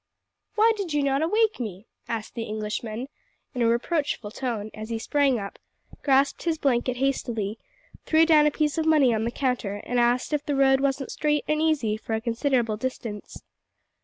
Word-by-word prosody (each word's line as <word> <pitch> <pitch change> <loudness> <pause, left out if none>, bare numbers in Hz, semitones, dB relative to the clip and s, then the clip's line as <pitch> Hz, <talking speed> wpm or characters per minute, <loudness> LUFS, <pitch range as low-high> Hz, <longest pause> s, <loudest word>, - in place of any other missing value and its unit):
"Why 445 +2 +5
did 375 -7 -3
you 290 - +2
not 275 0 +1
awake 430 +5 +2
me?" 210 -4 -6 0.2
asked 220 -2 -4
the 235 - -4
Englishman 215 +2 -4 0.5
in 250 - -3
a 230 - +4
reproachful 240 -2 -1
tone, 220 -4 -4
as 215 +1 -8
he 230 - -2
sprang 275 +2 +2
up, 200 -2 -7 0.4
grasped 275 0 +2
his 330 -2 0
blanket 255 -4 0
hastily, 230 -5 -1 0.5
threw 320 +1 +5
down 305 -2 +5
a - - +5
piece 300 +1 -1
of 320 - 0
money 290 -6 +5
on 220 0 0
the - - 0
counter, 250 -7 -1
and 245 0 0
asked 240 +4 +1
if 295 -1 0
the 290 -1 -1
road 270 -1 +4
wasn't 270 0 -1
straight 295 -1 0
and 305 0 +1
easy 280 -10 +1
for 225 0 -3
a - - -1
considerable 235 -1 0
distance. 225 -3 -6
260 Hz, 185 wpm, -25 LUFS, 225-295 Hz, 0.5 s, Why